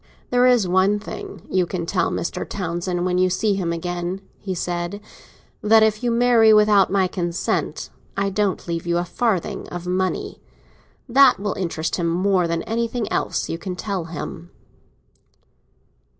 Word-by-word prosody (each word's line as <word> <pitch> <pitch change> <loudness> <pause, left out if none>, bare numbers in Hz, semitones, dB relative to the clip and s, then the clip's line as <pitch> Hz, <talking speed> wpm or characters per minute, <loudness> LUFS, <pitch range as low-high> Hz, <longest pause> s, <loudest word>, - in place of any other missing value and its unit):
"There 250 0 +4
is 245 -6 +4
one 190 +3 +3
thing 395 - -8
you 185 -2 +1
can 170 -1 -3
tell 180 +2 0
Mr. - - -3
Townsend 175 -1 -2
when 180 0 +1
you 185 0 +3
see 200 +3 +1
him 185 -4 -1
again," 175 +2 -3 0.2
he 190 -2 -4
said: 175 +3 -3 0.6
"that 220 +1 +5
if 215 -1 +2
you 240 - +1
marry 235 -1 +5
without 210 -2 +5
my 195 -1 +3
consent, 175 -2 -2 0.3
I 195 0 0
don't 200 -2 -1
leave 170 0 -3
you 170 0 +1
a 175 - 0
farthing 205 -1 -1
of 175 0 -6
money. 185 - -2 0.7
That 265 -1 +6
will 205 0 -2
interest 165 -3 -2
him 170 -2 0
more 180 +1 +2
than 165 0 -2
anything 230 -1 -2
else - - -1
you 165 - -4
can 185 0 -5
tell 190 -2 -3
him." 165 +1 -7
185 Hz, 160 wpm, -22 LUFS, 175-215 Hz, 0.7 s, That